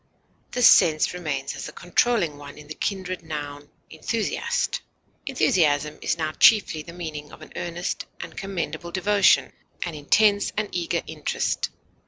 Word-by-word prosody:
This 250 -1 +2
sense 155 0 +5
remains 150 -6 -3
as - - -6
the - - -8
controlling 175 -4 +1
one 145 -1 -10
in 150 - -11
the 155 - -7
kindred 185 0 -3
noun 145 -2 -6 0.2
enthusiast. 215 +7 -1 0.5
Enthusiasm 150 - +2
has - - 0
now 155 -1 -1
chiefly 190 -3 +5
the 170 - -10
meaning 155 -4 -7
of 155 - -12
an - - -14
earnest 175 +1 -4
and - - -8
commendable 170 -4 -4
devotion, 200 +2 +3 0.3
an 170 - -4
intense 205 +8 +3
and 215 -1 -1
eager 175 -2 -1
interest. - - -2
170 Hz, 145 wpm, -24 LUFS, 150-195 Hz, 0.5 s, sense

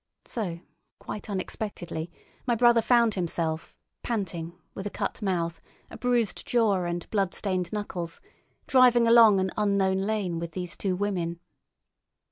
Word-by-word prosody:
So, 175 -7 -4 0.4
quite 210 - -7
unexpectedly, 185 -4 -4 0.4
my 240 - +3
brother 235 0 +5
found 235 -1 +4
himself, 165 -3 -2 0.3
panting, 175 -7 -3 0.2
with 195 +1 -5
a - - -3
cut - - -4
mouth, 170 -4 -1 0.3
a - - -8
bruised 245 -4 +1
jaw, 210 -7 +2
and 175 0 -3
bloodstained 190 -2 -1
knuckles, 180 -5 -4 0.5
driving 245 -3 +5
along 230 -4 +7
an 190 0 0
unknown 200 -2 +2
lane 195 -4 -1
with 170 -1 -5
these 180 -2 -5
two 190 -2 -1
women. 180 -4 -2
195 Hz, 130 wpm, -27 LUFS, 175-220 Hz, 0.5 s, along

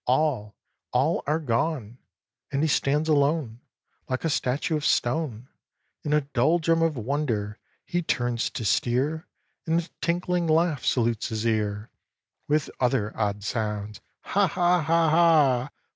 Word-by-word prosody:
All, 125 -6 +1 0.4
all 135 +7 +1
are 150 +2 +2
gone 125 -4 -2 0.5
And 140 +2 0
he - - +3
stands 150 +1 +1
alone, 145 -5 +1 0.5
Like 130 +4 -2
a 165 - +1
statue 140 +5 0
of 150 - -2
stone, 125 -3 0 0.5
In 150 - -4
a 150 0 +4
doldrum 160 +5 +1
of 165 -4 +1
wonder. 115 -4 -2 0.3
He 175 - -1
turns 120 -7 -1
to 115 - -5
steer, 135 - 0 0.4
And 165 +1 +2
a 170 - -6
tinkling 175 0 0
laugh 160 -3 +2
salutes 115 -3 +1
his 110 0 -3
ear 105 -1 -1 0.6
With 150 -1 0
other 120 -4 0
odd 105 -1 -2
sounds 105 -1 -3 0.2
"Ha! 200 0 +1
ha! 175 +1 +2
ha! 165 +1 +2
ha! 150 -6 +4
140 Hz, 140 wpm, -26 LUFS, 115-160 Hz, 0.6 s, a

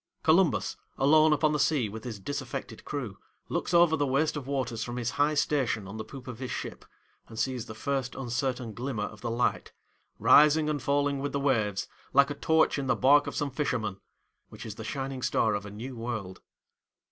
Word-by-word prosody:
Columbus, 160 - +3 0.2
alone 155 +3 +5
upon 150 0 +3
the 150 - 0
sea 140 -5 +2
with 110 +3 -8
his 110 -4 -5
disaffected 130 0 -5
crew, 125 -10 -5 0.3
looks - - -2
over 170 -2 +5
the 145 -2 0
waste 150 +4 +1
of 140 -3 -5
waters 125 -5 -2
from 120 0 -5
his 120 -1 -1
high 145 +2 +2
station 130 -9 0
on 100 +3 -7
the 110 - -4
poop 130 +4 -11
of 125 -2 -7
his 130 -1 -5
ship, - - -6 0.4
and 110 - -11
sees 125 -1 -2
the 110 - -8
first 135 +1 -2
uncertain 125 -2 -2
glimmer 120 -2 -3
of 105 0 -7
the 120 - -3
light, 120 +2 -1 0.4
'rising 150 +1 +6
and 145 -2 -2
falling 140 +1 +1
with 145 +1 -3
the 140 - 0
waves, 110 -8 0 0.3
like 140 +1 +5
a - - -1
torch 160 0 +2
in 135 - -3
the 130 - +3
bark 140 +5 +5
of - - -4
some 145 -2 -1
fisherman,' 110 -8 -2 0.5
which - - -10
is 110 - -5
the 110 - -8
shining 135 +3 -4
star 110 -2 +2
of 100 0 -3
a - - -7
new 120 +6 -7
world. 110 -5 -5
130 Hz, 205 wpm, -28 LUFS, 115-145 Hz, 0.5 s, rising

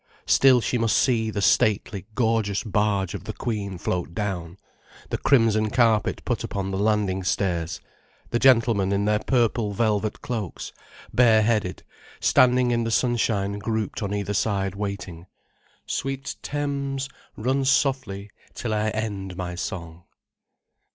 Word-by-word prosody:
Still 130 -2 +5
she 125 - -1
must 115 -1 +2
see 115 -4 +2
the 105 -2 -2
stately, 100 +2 +2
gorgeous 110 -4 +1
barge 105 -3 0
of - - -7
the - - -4
Queen 100 -5 -3
float 85 -1 -3
down, 95 -4 -3 0.5
the - - 0
crimson 110 -5 +3
carpet 115 -3 +2
put - - -1
upon 95 -1 -3
the 95 - -2
landing 100 -3 +1
stairs, 85 -3 -1 0.5
the 120 - +1
gentlemen 115 -7 +4
in 100 +1 +1
their 105 0 +2
purple 115 -4 +1
velvet 105 0 0
cloaks, 110 -8 -5 0.4
bare 115 -3 +5
headed, 105 -5 0 0.4
standing 125 -1 +4
in 120 -1 +1
the 115 - -2
sunshine 110 -4 0
grouped 110 0 -2
on 100 -2 -2
either 105 0 -2
side 100 -2 0
waiting. 100 -4 -5 0.6
"Sweet 135 0 -3
Thames, 140 -2 -2 0.3
run 130 +5 0
softly 130 -7 0 0.2
till 115 -3 -3
I 105 0 +1
end 100 -4 -4
my 90 -1 -4
song." 85 -2 -6
105 Hz, 135 wpm, -24 LUFS, 100-120 Hz, 0.6 s, Still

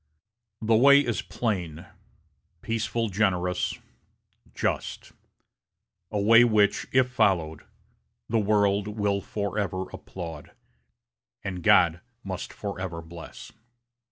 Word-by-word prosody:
The 110 +1 +3
way 140 +5 +7
is 120 -6 -1
plain, 90 -9 -3 0.8
peaceful 115 0 -1
generous, 90 -3 0 0.8
just - - -3 1.0
a 105 - -2
way 115 +4 +7
which, 105 -3 +2
if 130 -1 +3
followed, 95 -10 +1 0.6
the 115 0 +1
world 100 -1 +2
will 105 -2 -1
forever 100 -3 -3
applaud, 80 -5 -8 0.9
and 90 -2 -4
God 85 0 +4 0.2
must 95 -2 -5
forever 95 -5 -5
bless." 85 0 -11
100 Hz, 95 wpm, -26 LUFS, 90-110 Hz, 1.0 s, way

